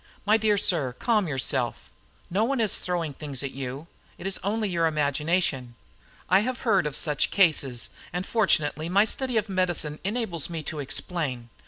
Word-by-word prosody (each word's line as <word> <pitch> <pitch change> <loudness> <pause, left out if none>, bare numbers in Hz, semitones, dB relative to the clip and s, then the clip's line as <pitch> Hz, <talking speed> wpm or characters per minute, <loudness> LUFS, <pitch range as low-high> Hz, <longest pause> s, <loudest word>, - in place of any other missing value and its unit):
My 210 +1 +5
dear 215 -2 +3
sir, 155 -10 +1
calm 215 -6 +2
yourself. 130 -3 -1 0.4
No 200 +5 +2
one 265 +2 0
is 220 -3 +2
throwing 170 -4 -2
things 140 -1 -4
at 135 - -3
you. 135 +2 -6 0.3
It 175 - -10
is 195 0 -1
only 215 +2 0
your 170 -3 +1
imagination. 150 -3 0 0.5
I 185 +2 +5
have 245 +3 -2
heard 190 -6 +3
of 145 - -4
such 150 -3 +1
cases, 145 -10 +2 0.2
and 180 +2 -3
fortunately 165 -8 +1
my 200 +4 +5
study 255 +1 +1
of 215 0 +1
medicine 175 -6 0
enables 195 - -2
me 165 -2 -4
to 155 0 -4
explain. 135 -4 -2
170 Hz, 170 wpm, -26 LUFS, 145-200 Hz, 0.5 s, My